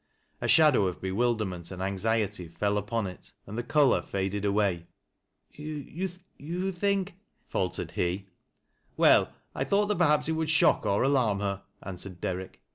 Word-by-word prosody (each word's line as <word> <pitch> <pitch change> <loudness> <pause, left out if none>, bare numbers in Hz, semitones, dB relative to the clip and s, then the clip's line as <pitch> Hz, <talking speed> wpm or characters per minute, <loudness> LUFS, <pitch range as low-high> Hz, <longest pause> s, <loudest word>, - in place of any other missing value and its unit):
A - - -1
shadow 150 -11 +5
of 90 - -4
bewilderment 95 -3 -1
and 95 - -8
anxiety 100 0 -1
fell 100 +5 -1
upon 110 +2 -2
it 95 +2 -9
and 100 - -8
the 120 - -1
color 140 +2 +3
faded 100 +1 -2
away. 100 -4 +1 0.3
" - - -49
You 175 +4 -5
think—" 195 +1 0 0.3
faltered 90 -2 -2
he. 90 +3 -1 0.4
" - - -42
Well, - - +5 0.2
I - - -1
thought 205 +1 +2
that 210 - 0
perhaps 150 -3 +3
it - - +1
would 160 -1 -1
shock 155 - +4
cr - - -4
alarm 120 0 +2
bcr," 100 -1 -2 0.2
answered 95 -1 -7
Derrick. 95 +1 -4
105 Hz, 155 wpm, -28 LUFS, 95-150 Hz, 0.4 s, shadow